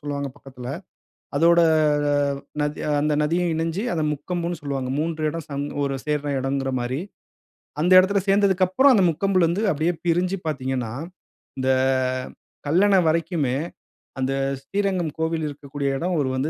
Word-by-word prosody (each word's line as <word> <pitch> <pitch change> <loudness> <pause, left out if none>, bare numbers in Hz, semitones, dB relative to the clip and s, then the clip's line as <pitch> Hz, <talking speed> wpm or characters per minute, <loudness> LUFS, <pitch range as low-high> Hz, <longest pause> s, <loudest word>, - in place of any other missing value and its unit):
சொல்லுவாங்க 140 -1 -3
பக்கத்தில. 130 -3 -10 0.7
அதோட 170 +2 +5 1.0
நதி, 150 0 -2 0.2
அந்த 150 +1 +1
நதியும் 170 +3 +1
இணைஞ்சு 165 +5 -2
அத 165 - -1
முக்கொம்புன்னு 170 +3 -4
சொல்லுவாங்க. 135 -3 -3
3 160 0 -2
இடம் 165 0 -6
சம் 140 0 -3 0.2
ஒரு 140 -1 -1
சேர்ற 150 -1 -1
எடம்ங்கிற 135 0 -1
மாரி. 125 +3 -2 0.8
அந்த 175 +3 +2
எடத்தில 195 +2 +3
சேர்ந்ததற்கப்புறம் 195 +6 +4
அந்த 195 - +4
முக்கொம்பிலருந்து 185 +2 +1
அப்டியே 160 +4 0
பிரிஞ்சு 180 +3 +1
பார்த்தீங்கன்னா, 130 -6 -2 0.7
இந்த 130 0 0 1.0
கல்லணை 195 +5 +4
வரைக்குமே, 155 -5 0 0.6
அந்த 130 +1 0 0.3
ஸ்ரீரங்கம் 190 0 -1
கோவில் 160 0 -1
இருக்கக்கூடிய 140 0 -4
இடம் 175 +4 -1
ஒரு 135 - 0
வந்து 135 +4 -1
160 Hz, 125 wpm, -23 LUFS, 140-180 Hz, 1.0 s, அதோட